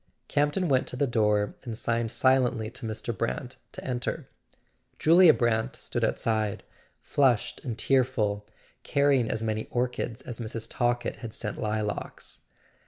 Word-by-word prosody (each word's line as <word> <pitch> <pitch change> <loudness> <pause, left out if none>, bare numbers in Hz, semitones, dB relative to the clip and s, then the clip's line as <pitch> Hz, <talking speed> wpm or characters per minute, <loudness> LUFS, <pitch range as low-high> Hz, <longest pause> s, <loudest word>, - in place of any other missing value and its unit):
Campton 145 +6 +1
went 130 -3 +2
to - - -5
the 140 - +2
door 105 -4 +2
and 115 -4 -5
signed 115 -1 0
silently 125 -4 +2
to 120 -2 -6
Mr. 110 +1 -4
Brant 120 +3 -3 0.2
to - - -8
enter. 125 -2 -3 0.7
Julia 170 +1 +7
Brant 120 +2 +1
stood 120 -5 -3
outside, 110 -2 0 0.4
flushed 130 -6 +1
and 120 -4 -4
tearful, 115 -7 +1 0.3
carrying 140 -5 +2
as 110 0 -2
many 110 0 -2
orchids 125 0 -2
as 120 -1 -7
Mrs. 115 -1 -5
Talkett 120 0 0
had 115 -2 -7
sent 105 -2 -4
lilacs. 105 -1 -3
120 Hz, 140 wpm, -28 LUFS, 110-130 Hz, 0.7 s, Julia